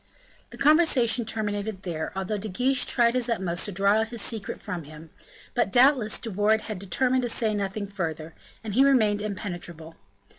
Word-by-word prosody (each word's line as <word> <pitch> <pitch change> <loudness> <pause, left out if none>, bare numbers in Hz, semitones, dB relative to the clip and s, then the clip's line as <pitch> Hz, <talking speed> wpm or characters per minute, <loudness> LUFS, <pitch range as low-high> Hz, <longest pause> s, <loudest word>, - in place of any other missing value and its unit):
The - - -12
conversation 275 -7 +4
terminated 205 -2 -3
there, 160 -3 -4
although 195 +2 -3
De 215 +2 -6
Guiche 250 +7 +1
tried 235 -2 +3
his 250 -1 0
utmost 185 -6 -2
to 205 - -3
draw 200 +3 +2
out 220 - 0
his 235 +1 -5
secret 220 -3 -4
from 170 -4 -6
him; 155 +2 -13 0.4
but, 240 -5 0
doubtless, 245 -3 +4
De 225 - -6
Wardes 210 +3 +1
had 215 -4 -5
determined 255 +7 0
to 245 - -2
say 225 -1 0
nothing 200 0 -3
further, 165 -5 -5 0.3
and 215 -2 -5
he 260 +5 +5
remained 220 -7 +3
impenetrable. 175 -5 -6
210 Hz, 180 wpm, -25 LUFS, 190-235 Hz, 0.4 s, he